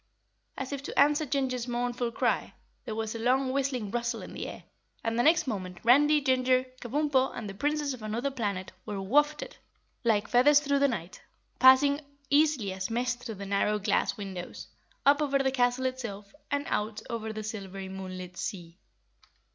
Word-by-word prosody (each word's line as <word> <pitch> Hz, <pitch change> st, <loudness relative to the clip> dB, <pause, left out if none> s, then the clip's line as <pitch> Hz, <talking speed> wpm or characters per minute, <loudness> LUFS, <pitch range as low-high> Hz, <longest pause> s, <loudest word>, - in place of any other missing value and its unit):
As 265 Hz, +1 st, -4 dB
if 280 Hz, -, -4 dB
to -, -, -7 dB
answer 295 Hz, +2 st, +4 dB
Ginger's 255 Hz, -3 st, -1 dB
mournful 240 Hz, 0 st, -1 dB
cry, -, -, 0 dB, 0.3 s
there 220 Hz, -4 st, -4 dB
was 220 Hz, 0 st, -3 dB
a 230 Hz, -, -5 dB
long 255 Hz, +3 st, +2 dB
whistling 260 Hz, -7 st, -1 dB
rustle 235 Hz, 0 st, -2 dB
in -, -, -9 dB
the -, -, -5 dB
air, -, -, -9 dB, 0.4 s
and 225 Hz, 0 st, -1 dB
next 315 Hz, +7 st, +4 dB
moment 185 Hz, -7 st, -4 dB
Randy, 295 Hz, +6 st, +5 dB
Ginger, 255 Hz, -1 st, +2 dB, 0.2 s
Kabumpo 270 Hz, +1 st, +1 dB
and 225 Hz, -, -5 dB
the 195 Hz, -, -6 dB
Princess 290 Hz, +5 st, -1 dB
of 250 Hz, -, -9 dB
Anuther 230 Hz, +6 st, -2 dB
Planet 200 Hz, -7 st, -3 dB
were 205 Hz, -2 st, -5 dB
wafted 295 Hz, +10 st, +1 dB, 0.5 s
like 210 Hz, -3 st, +2 dB
feathers 280 Hz, +4 st, +6 dB
through 280 Hz, -1 st, +1 dB
the 280 Hz, -, +4 dB
night, 185 Hz, -8 st, -5 dB, 0.4 s
passing 270 Hz, +3 st, +6 dB, 0.3 s
easily 285 Hz, -9 st, +3 dB
as 190 Hz, 0 st, -4 dB
mist 245 Hz, +1 st, -1 dB
through 225 Hz, -3 st, -5 dB
the 200 Hz, 0 st, -7 dB
narrow 200 Hz, +2 st, +1 dB
glass 205 Hz, 0 st, 0 dB
windows, 190 Hz, -3 st, -7 dB, 0.4 s
up 285 Hz, +2 st, +5 dB
over 280 Hz, -2 st, +2 dB
the 270 Hz, -1 st, +1 dB
castle 250 Hz, 0 st, +1 dB
itself 225 Hz, -6 st, -4 dB, 0.2 s
and 285 Hz, 0 st, -1 dB
out 215 Hz, +1 st, -2 dB
over 225 Hz, -2 st, -4 dB
the 215 Hz, 0 st, -5 dB
silvery 195 Hz, -3 st, -6 dB
moonlit 185 Hz, -1 st, -7 dB
sea. 175 Hz, -3 st, -6 dB
245 Hz, 170 wpm, -29 LUFS, 210-275 Hz, 0.5 s, feathers